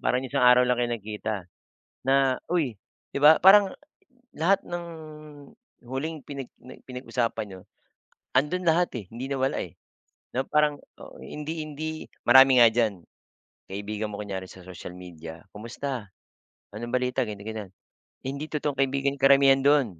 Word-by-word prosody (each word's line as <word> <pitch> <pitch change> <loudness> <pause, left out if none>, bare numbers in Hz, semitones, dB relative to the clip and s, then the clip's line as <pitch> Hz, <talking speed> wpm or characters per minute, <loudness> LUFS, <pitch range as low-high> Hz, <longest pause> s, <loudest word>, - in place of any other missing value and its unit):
Parang 125 +1 +1
isang 130 -1 0
araw 125 0 +7
lang 125 -1 +1
kayo 120 -1 0
nagkita 110 0 -4 0.7
na, 135 -1 +3
"uy," 155 -10 0 0.4
'di - - 0
ba, 155 +2 +8
parang 195 +1 +7 0.6
lahat 190 +5 +2
ng 175 0 -5 1.0
huling 140 +5 -4
pinag 140 -3 -7 0.2
n 125 - -12
pinag-usapan 125 -3 -2
nIyo, 95 -1 -10 0.8
andun 150 +7 +1
lahat, 170 +1 +3
eh, 115 -5 -5
hindi 120 +3 -6
nawala, 135 -1 -1
eh, - - -5 0.6
'no, 130 +2 -1
parang 150 -1 +2 0.2
o - - -12
hindi 150 - -6
hindi 155 +1 -6 0.2
marami 130 0 +7
nga 115 - +8
diyan 110 -6 0 0.6
kaibigan 105 +2 -5
mo 100 - -7
kunyari 95 -2 -5
sa 95 - -13
social 90 -1 -9
media. 85 -3 -10 0.2
"Kumusta 120 +1 -5 0.7
anong 120 +2 -6
balita?" 125 0 +1
ganyan-ganyan, 105 -1 -7 0.5
hindi 140 +3 -4
totoong 145 -3 -3
kaibigan 135 +1 0
karamihan 135 0 +6
do'n. 135 - +2
130 Hz, 140 wpm, -26 LUFS, 110-145 Hz, 1.0 s, ba